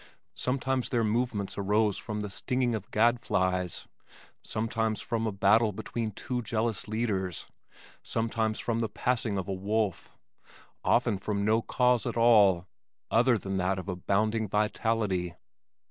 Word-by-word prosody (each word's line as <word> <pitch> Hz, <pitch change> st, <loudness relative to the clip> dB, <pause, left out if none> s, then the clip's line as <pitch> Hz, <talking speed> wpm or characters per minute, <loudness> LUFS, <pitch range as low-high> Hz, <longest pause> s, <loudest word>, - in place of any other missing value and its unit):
Sometimes 130 Hz, 0 st, -1 dB
their 120 Hz, -2 st, +1 dB
movements 110 Hz, -3 st, -1 dB
arose 105 Hz, +1 st, +2 dB
from 105 Hz, -3 st, -4 dB
the 105 Hz, -, -4 dB
stinging 125 Hz, +2 st, 0 dB
of 110 Hz, 0 st, -4 dB
gadflies, 95 Hz, -7 st, +1 dB, 0.6 s
sometimes 110 Hz, 0 st, -1 dB
from 115 Hz, 0 st, -2 dB
a -, -, 0 dB
battle 105 Hz, +3 st, +4 dB
between 115 Hz, +3 st, -4 dB
two 125 Hz, +4 st, -4 dB
jealous 110 Hz, -1 st, -1 dB
leaders, 105 Hz, -6 st, -2 dB, 0.6 s
sometimes 110 Hz, -1 st, -1 dB
from 115 Hz, -1 st, -1 dB
the 115 Hz, -2 st, -1 dB
passing 115 Hz, -2 st, -1 dB
of 95 Hz, -, -3 dB
a 100 Hz, -, -2 dB
wolf 100 Hz, +1 st, -1 dB, 0.7 s
often 115 Hz, -5 st, +2 dB
from 100 Hz, +1 st, -2 dB
no 110 Hz, +2 st, +3 dB
cause 125 Hz, 0 st, +2 dB
at -, -, -3 dB
all 105 Hz, -7 st, +5 dB, 0.5 s
other 120 Hz, +1 st, +4 dB
than 95 Hz, -1 st, -3 dB
that 95 Hz, +1 st, 0 dB
of 95 Hz, -, -6 dB
abounding 105 Hz, +4 st, 0 dB
vitality. 105 Hz, -3 st, 0 dB
110 Hz, 135 wpm, -29 LUFS, 100-115 Hz, 0.7 s, all